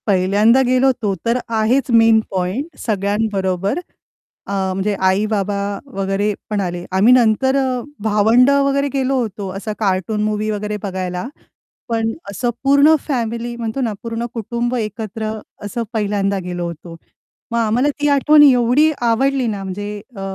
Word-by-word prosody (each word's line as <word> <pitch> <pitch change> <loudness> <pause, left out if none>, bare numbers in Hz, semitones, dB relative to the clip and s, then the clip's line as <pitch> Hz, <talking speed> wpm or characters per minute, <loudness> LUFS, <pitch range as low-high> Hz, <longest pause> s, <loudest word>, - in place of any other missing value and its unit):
पहिल्यांदा 205 +6 +4
गेलो 255 +1 +3
होतो, 230 -6 0
तर 230 +1 +2 0.2
आहेच 245 +6 +1
मेन 225 -1 +5
पॉइंट 200 - -3
सगळ्यांबरोबर, 200 - -1 0.7
अ, - - -5 0.2
म्हणजे 195 +2 -1 0.2
आई-बाबा 205 0 0 0.4
वगैरे 195 +2 -1 0.2
पण 210 -2 -1
आले. 175 -1 -4
आम्ही 200 +6 +5
नंतर 250 +2 +3 0.5
भावंड 220 +4 +4
वगैरे 280 0 +2
गेलो 270 0 0
होतो, 205 -4 -5
असा 210 +2 -4
कार्टून 200 +1 0
मूव्ही 215 0 -1
वगैरे 210 0 -3
बघायला. 185 0 -3 0.6
पण 225 -1 0 0.2
असं 240 +5 -2
पूर्ण 280 +3 +5
फॅमिली 235 -3 -2
म्हणतो 235 +2 -3
ना, 230 -4 -1
पूर्ण 230 0 -3
कुटुंब 235 +2 -2
एकत्र 220 -1 -4 0.3
असं 235 +3 -3
पहिल्यांदा 200 -2 0
गेलो 175 -1 -4
होतो. 170 0 -9 0.6
मग 235 - 0
आम्हाला 230 +5 +2
ती 295 - +1
आठवण 295 +2 +6
एवढी 265 +3 +4 0.2
आवडली 265 +2 +1
ना, 205 -3 -3
म्हणजे 205 +2 -5 0.2
अ, 195 - -7
220 Hz, 140 wpm, -18 LUFS, 200-245 Hz, 0.7 s, आठवण